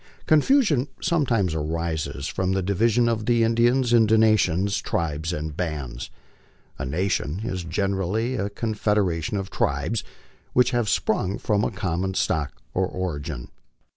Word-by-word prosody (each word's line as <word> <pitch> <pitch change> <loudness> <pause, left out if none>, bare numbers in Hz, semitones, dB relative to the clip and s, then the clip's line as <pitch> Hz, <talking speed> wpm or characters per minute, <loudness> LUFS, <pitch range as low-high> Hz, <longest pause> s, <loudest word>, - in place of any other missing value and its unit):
Confusion 155 - +3
sometimes 120 - +1
arises 80 -2 -3
from 95 0 -1
the 95 -1 0
division 115 +5 +2
of 110 -2 -1
the 120 -1 +3
Indians 120 +2 +3
into 110 -2 +5
nations, 100 -3 +3
tribes, 80 -5 -2
and 75 -2 -4
bands. 70 -8 -4 0.7
A - - -2
nation 90 +2 -1
is 95 -6 -3
generally 100 +6 -1
a 100 -5 -2
confederation 105 -5 0
of 95 -1 -4
tribes 75 +11 -1 0.5
which 125 0 +4
have 120 -4 0
sprung 95 +2 0
from 105 -1 0
a - - +1
common 95 0 -2
stock 75 -6 0 0.2
or 95 0 +1
origin. 75 -9 -4
95 Hz, 135 wpm, -24 LUFS, 80-115 Hz, 0.7 s, into